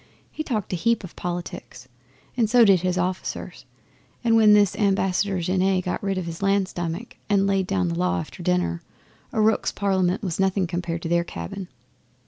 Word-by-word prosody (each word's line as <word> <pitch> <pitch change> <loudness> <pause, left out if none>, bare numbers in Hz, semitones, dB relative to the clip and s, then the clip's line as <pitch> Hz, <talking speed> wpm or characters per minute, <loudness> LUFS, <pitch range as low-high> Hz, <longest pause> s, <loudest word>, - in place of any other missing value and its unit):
He - - -5
talked 215 -10 -3
a - - +2
heap 230 +5 +1
of 185 - -10
politics, 175 -7 -6 0.5
and 230 -4 +1
so 240 0 +6
did 195 -3 +5
his 180 0 0
officers, 180 +1 -3 0.6
and 230 -1 +3
when 215 -2 +7
this 205 -2 +4
Ambassador 195 -1 +1
Genet 185 +1 +1
got 180 - -2
rid 195 -1 -1
of 185 - -2
his 165 +1 -6
land 195 -1 +2
stomach 175 +6 -5
and 200 -1 +3
laid 195 -2 +1
down 90 -2 0
the 85 - -1
law 90 +1 0
after 85 - -8
dinner, 85 -2 0 0.5
a - - -2
rooks' 220 +1 +2
parliament 190 -1 0
was 180 -3 -3
nothing 190 0 +2
compared 170 -1 -3
to - - -2
their 170 +1 +2
cabin. 170 - -7
185 Hz, 185 wpm, -24 LUFS, 170-200 Hz, 0.6 s, when